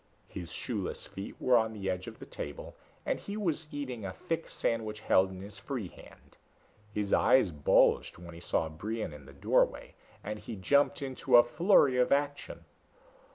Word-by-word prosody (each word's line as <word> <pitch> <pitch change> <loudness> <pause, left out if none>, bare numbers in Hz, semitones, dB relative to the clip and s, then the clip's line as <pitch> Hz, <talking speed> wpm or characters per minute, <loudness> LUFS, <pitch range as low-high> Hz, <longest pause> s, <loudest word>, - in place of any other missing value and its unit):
His 85 -5 -7
shoeless - - -4
feet 95 - -8
were 130 - +4
on 110 -1 +2
the 100 -3 -5
edge 90 -1 -2
of - - -8
the - - -10
table, 75 - -7 0.3
and - - -1
he 200 +1 -6
was 165 -6 -2
eating 130 -6 -5
a 95 - -4
thick 165 - -4
sandwich 110 -2 -2
held 95 -2 +3
in 95 -1 -9
his 100 +1 -10
free 120 -10 -4
hand. - - -17 0.5
His 105 -1 -2
eyes 130 -9 +5
bulged 75 -2 +3
when 85 -1 -10
he 85 - -10
saw 80 - 0
Brion 100 +4 -4
in 70 -2 -12
the - - -11
doorway 70 - +1 0.3
and 105 - -5
he - - -7
jumped 140 +9 +2
into 130 -1 +3
a 120 - +9
flurry 150 -1 +4
of 125 - +3
action. 145 0 -1
110 Hz, 180 wpm, -31 LUFS, 95-135 Hz, 0.5 s, a